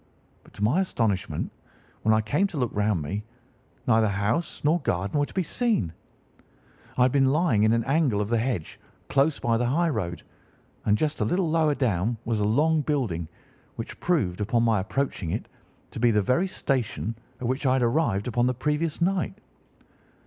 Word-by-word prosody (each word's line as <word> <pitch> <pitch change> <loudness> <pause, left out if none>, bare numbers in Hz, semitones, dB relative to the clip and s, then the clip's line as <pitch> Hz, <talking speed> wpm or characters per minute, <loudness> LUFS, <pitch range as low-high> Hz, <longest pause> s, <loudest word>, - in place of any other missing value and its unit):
But - - -20
to 100 - -5
my 125 - +3
astonishment, 100 - -1 0.5
when 110 - +2
I 110 0 +4
came 145 - +1
to 185 -6 -8
look 125 -4 0
round 105 -5 +1
me, 100 +8 -4 0.6
neither 110 -2 +4
house 100 - -1
nor 155 +4 +3
garden 100 - -1
were 145 - +1
to - - -14
be 190 - +1
seen. 175 - 0 1.0
I 125 - +5
had 125 - +4
been 135 -1 +3
lying 150 -8 +2
in 110 +1 +4
an 115 0 +2
angle 135 -6 +2
of 105 - -1
the 115 -1 +2
hedge 115 -9 -3 0.3
close 140 +2 +2
by 115 -1 +1
the 120 - 0
highroad, 125 - 0 0.6
and 105 0 +3
just 155 +3 -1
a - - +3
little 180 0 +1
lower 155 -2 +3
down 115 -3 0
was 115 -2 0
a 105 - +1
long 150 +9 +3
building, 120 - -1 0.5
which - - -7
proved, 105 - 0
upon 115 +3 +1
my 115 -3 +3
approaching 105 -3 -2
it, - - -3 0.4
to - - -6
be 120 +1 +4
the 105 -2 +2
very 130 - +2
station 125 - -2 0.2
at 125 - -5
which 130 +3 0
I 130 - +4
had 130 -1 +2
arrived 115 -5 +1
upon 120 +1 +1
the 125 - 0
previous 150 +5 -1
night. 190 +2 0
120 Hz, 185 wpm, -26 LUFS, 105-150 Hz, 1.0 s, I